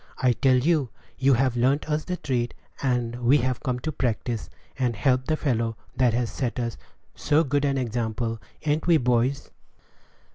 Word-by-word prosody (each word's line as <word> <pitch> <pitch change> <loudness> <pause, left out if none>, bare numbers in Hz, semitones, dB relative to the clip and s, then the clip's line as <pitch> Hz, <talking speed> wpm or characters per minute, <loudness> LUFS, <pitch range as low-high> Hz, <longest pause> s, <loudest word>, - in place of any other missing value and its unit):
I 125 - +3
tell 130 +1 +3
you, 145 -1 +2 0.3
you've 130 -2 +3
learnt 130 +6 +2
us 150 0 -1
the 180 -1 -3
trade, 120 -6 -2 0.3
and 120 -3 0
we've 130 0 +3
come 125 -4 -2
to 155 - -2
practise, 120 -3 -2 0.3
and 125 -3 +1
help 130 +3 +2
the 155 - +1
fellow 115 -6 -1 0.2
that 125 -3 +3
has 120 -3 -1
set 125 +1 -2
us 115 -2 -2 0.4
so 155 +2 +2
good 145 0 0
an 140 -1 +1
example 115 -2 -2 0.2
ain't 155 +2 0
we, 170 -2 +6
boys?" 125 +1 0
125 Hz, 160 wpm, -25 LUFS, 120-140 Hz, 0.4 s, we